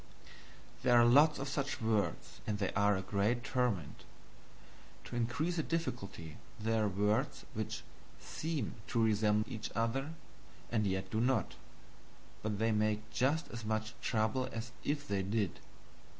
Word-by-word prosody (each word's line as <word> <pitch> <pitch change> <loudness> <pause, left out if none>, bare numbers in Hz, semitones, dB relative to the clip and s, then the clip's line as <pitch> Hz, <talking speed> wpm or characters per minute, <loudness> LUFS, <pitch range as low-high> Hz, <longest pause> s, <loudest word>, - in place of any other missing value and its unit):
There 120 -1 +6
are 120 - +7
lots 145 +6 +6
of 140 - -3
such 140 0 -2
words 110 -2 -1
and 105 -1 0
they 100 -2 -1
are 100 0 +3
a 95 - -3
great 105 +5 +1
torment. 125 - -1 1.0
To - - -7
increase 130 +9 0
the - - +3
difficulty 110 - -3 0.2
there 110 0 +1
are - - +2
words 110 +8 0
which 110 -1 -3 0.4
SEEM 155 -8 -3
to 115 - +2
resemble 105 +1 +2
each 110 -1 -4
other, 135 +7 0 0.6
and 110 -3 +2
yet 95 0 -2
do 110 - +1
not; 125 -1 +2 0.9
but 105 -1 -1
they 115 +2 +2
make 110 0 0
just 140 +9 +1
as 115 -2 -6
much 110 +1 -1
trouble 115 +3 +1
as 115 +1 -5
if 145 0 -1
they 100 -1 0
did. 100 +1 -1
110 Hz, 150 wpm, -34 LUFS, 105-130 Hz, 1.0 s, are